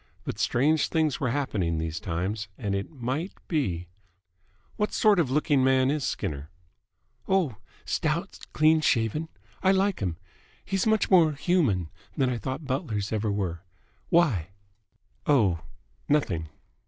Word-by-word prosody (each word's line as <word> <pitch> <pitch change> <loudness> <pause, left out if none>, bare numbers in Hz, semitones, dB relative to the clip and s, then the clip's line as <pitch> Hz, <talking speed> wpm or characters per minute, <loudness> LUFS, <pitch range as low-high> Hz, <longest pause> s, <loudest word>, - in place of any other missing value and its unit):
But 105 - -5
strange 140 +6 +2
things 155 -4 +1
were 135 - 0
happening 105 - -1
these 80 0 -3
times, 95 +5 -3
and 100 -1 -2
it 100 0 -2
might 140 +5 -3
be... 95 - -1 0.9
"What 210 - -1
sort 210 -4 +4
of 155 -7 +2
looking 145 -1 +2
man 130 0 +4
is 150 -1 -1
Skinner?" 75 -11 -3 0.8
"Oh, 175 - +1 0.3
stout, - - -1
clean 155 +1 +4
shaven. 135 +5 +1 0.3
I 190 - +4
like 195 0 +2
him. 90 -5 -2 0.5
He's 195 +2 0
much 220 -2 +2
more 165 -5 +6
human 140 - +1 0.3
than 130 -2 +2
I 120 - -2
thought 130 +7 -4
butlers 110 -7 -2
ever 110 -1 0
were. 90 -5 -2 0.5
Why?" 135 - +3 0.8
"Oh, 105 - +3 0.5
nothing." 95 - +1
130 Hz, 135 wpm, -27 LUFS, 100-155 Hz, 0.9 s, more